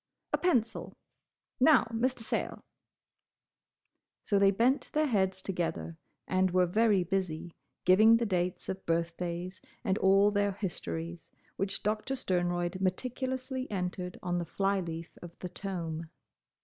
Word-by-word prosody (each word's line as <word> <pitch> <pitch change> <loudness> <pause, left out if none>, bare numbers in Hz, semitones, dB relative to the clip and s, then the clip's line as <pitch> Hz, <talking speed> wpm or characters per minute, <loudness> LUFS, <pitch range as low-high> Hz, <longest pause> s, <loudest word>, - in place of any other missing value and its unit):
"A - - +4
pencil! 240 -11 +1 0.7
Now, 275 +1 +6
Mr. 245 +2 0
Sayle—" - - -3 1.6
So 200 - +2
they 195 0 +6
bent 235 +7 +2
their 305 0 +3
heads 190 -7 +1
together, 170 -3 -3 0.3
and 185 0 +2
were 180 0 +3
very 205 +1 +3
busy, 175 -2 -2 0.3
giving 215 +5 +7
the 235 - 0
dates 180 -3 -1
of 190 0 -4
birthdays, 170 +2 -2 0.2
and 200 -3 +1
all 195 +2 +5
their 205 -1 +1
histories, 170 -3 -4 0.3
which 195 0 -2
Doctor 215 +6 -1
Sternroyd 175 -4 -1
meticulously 255 +6 -2
entered 180 -2 -3
on 175 0 0
the 170 - -3
fly 195 +3 0
leaf 165 -2 -6
of 175 -1 -10
the 180 - -6
tome. 170 -4 -5
190 Hz, 130 wpm, -31 LUFS, 175-215 Hz, 1.6 s, giving